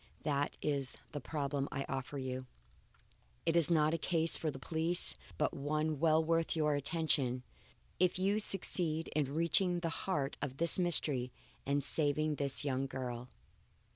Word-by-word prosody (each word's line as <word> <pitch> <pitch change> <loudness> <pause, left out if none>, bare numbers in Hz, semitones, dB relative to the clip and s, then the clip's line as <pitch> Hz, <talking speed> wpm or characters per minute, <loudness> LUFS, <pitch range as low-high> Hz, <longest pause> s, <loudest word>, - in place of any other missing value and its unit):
That 145 -1 -2
is 140 -3 -2
the 145 - -6
problem 140 -1 -3
I 135 0 -4
offer 135 +1 -5
you. 130 -1 -5 1.0
It 165 0 +1
is 170 -2 +7
not 155 -2 +2
a 165 - -2
case 165 0 +2
for 160 - -1
the 135 - -7
police 165 +5 +6 0.2
but - - -1
one 150 +1 -2
well 160 0 +3
worth 165 0 0
your 150 -2 +1
attention, 145 -4 -1 0.6
if 180 0 +2
you 195 +3 0
succeed 170 -5 -3
in 145 -2 -2
reaching 175 +2 +2
the 165 - -2
heart 150 -5 -3
of 135 -2 -5
this 170 +3 +5
mystery 145 -8 +1 0.4
and 140 0 0
saving 150 +1 +1
this 140 0 -2
young 135 -1 -2
girl. 125 -2 -6
150 Hz, 155 wpm, -33 LUFS, 135-165 Hz, 1.0 s, is